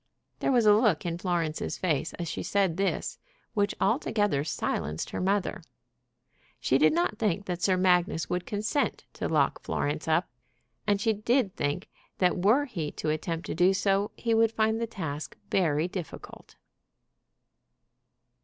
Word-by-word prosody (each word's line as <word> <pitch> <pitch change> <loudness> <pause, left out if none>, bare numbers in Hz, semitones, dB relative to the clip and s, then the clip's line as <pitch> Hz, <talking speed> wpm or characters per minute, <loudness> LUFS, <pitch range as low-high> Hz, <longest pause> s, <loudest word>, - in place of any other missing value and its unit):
There - - +1
was 240 -4 +4
a 210 - +8
look 210 -7 +3
in 170 0 -2
Florence's 170 -4 -1
face 160 -4 -1
as 170 - -5
she - - -3
said 195 -5 +1
this 195 +2 -1 0.3
which 205 -2 +1
altogether 210 - +1
silenced 80 - -2
her - - -3
mother. 195 0 0 1.0
She 135 - +2
did 155 0 +5
not 175 +6 0
think 200 -2 0
that 180 -2 -3
Sir 185 0 +3
Magnus 180 -3 +2
would 180 0 -2
consent 215 +7 -1
to - - -3
lock - - +2
Florence - - -2
up, - - +2 0.6
and 205 -1 +3
she 220 +2 +2
did 215 0 +1
think 145 +5 -2 0.3
that 180 -1 +2
were 245 +9 +4
he 170 - -4
to 155 - -3
attempt 165 +2 -3
to - - -3
do 180 +3 +4
so 200 +1 +1
he 230 -1 0
would 225 0 +4
find 220 0 +1
the 230 - -1
task 160 -8 -5
very 160 -3 +2
difficult. 180 -3 -8
185 Hz, 155 wpm, -28 LUFS, 165-210 Hz, 1.0 s, a